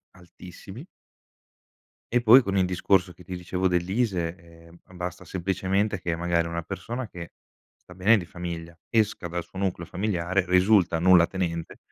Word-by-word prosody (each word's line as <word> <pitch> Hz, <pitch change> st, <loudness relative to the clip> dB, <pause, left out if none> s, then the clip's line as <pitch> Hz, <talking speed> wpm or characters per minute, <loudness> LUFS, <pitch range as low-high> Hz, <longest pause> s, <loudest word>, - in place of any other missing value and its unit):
altissimi. 90 Hz, -, -12 dB, 1.3 s
E 120 Hz, -, +3 dB
poi, 120 Hz, +3 st, +8 dB
con 100 Hz, -3 st, -2 dB
il 95 Hz, -, +3 dB
discorso, 90 Hz, 0 st, +1 dB
che 90 Hz, -, -16 dB
ti 90 Hz, +1 st, -6 dB
dicevo, 90 Hz, +1 st, -1 dB
dell'ISEE, 90 Hz, -1 st, -1 dB, 0.3 s
eh, -, -, -16 dB
ma -, -, -19 dB
basta 90 Hz, 0 st, -6 dB
semplicemente 95 Hz, +3 st, -1 dB
che, 85 Hz, -1 st, -2 dB
magari, 85 Hz, 0 st, 0 dB
una 85 Hz, 0 st, -3 dB
persona 115 Hz, +8 st, -5 dB
che, 85 Hz, -4 st, -9 dB, 0.4 s
sta 90 Hz, -, -17 dB
bene 100 Hz, +5 st, +4 dB
di 90 Hz, -, -4 dB
famiglia, 85 Hz, -1 st, -7 dB
esca 110 Hz, -5 st, +1 dB
dal 85 Hz, 0 st, -4 dB
suo 95 Hz, -, -14 dB
nucleo 90 Hz, -3 st, -2 dB
familiare, 95 Hz, -1 st, -1 dB
risulta 90 Hz, -2 st, +4 dB
nullatenente, 85 Hz, -1 st, +2 dB
90 Hz, 150 wpm, -26 LUFS, 85-95 Hz, 1.3 s, poi